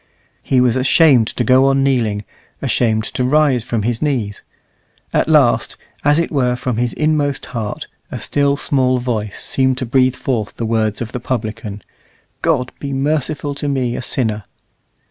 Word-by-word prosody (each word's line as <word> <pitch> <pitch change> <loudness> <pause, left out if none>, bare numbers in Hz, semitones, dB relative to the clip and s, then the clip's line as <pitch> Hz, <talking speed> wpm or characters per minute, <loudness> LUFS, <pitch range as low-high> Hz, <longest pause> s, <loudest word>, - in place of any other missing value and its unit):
He 130 - +1
was 125 -1 +3
ashamed 130 -3 +4
to 120 - -2
go 130 +3 +5
on 135 0 +2
kneeling, 115 -7 +1 0.4
ashamed 110 -2 +1
to 125 - -1
rise 135 -2 +3
from 115 -2 -2
his 115 +1 -1
knees. 120 -9 -1 0.7
At - - +1
last, - - +3 0.3
as 145 +1 +4
it 170 - 0
were 125 -5 +1
from 125 -2 -3
his 120 0 0
inmost 150 -3 0
heart, 110 -3 -4 0.2
a - - -5
still, 140 0 0
small 130 -3 +1
voice 110 -5 -3
seemed 130 -1 0
to 130 - -2
breathe 130 +1 +2
forth 115 -6 -2
the 115 - -2
words 110 0 0
of 110 - -8
the 125 - -4
publican, 110 -5 -4 0.6
"God 135 -6 +1
be 140 -1 -4
merciful 145 +1 -1
to 145 +1 -4
me 130 -4 -1
a - - -3
sinner!" 110 -5 -2
125 Hz, 165 wpm, -18 LUFS, 115-140 Hz, 0.7 s, go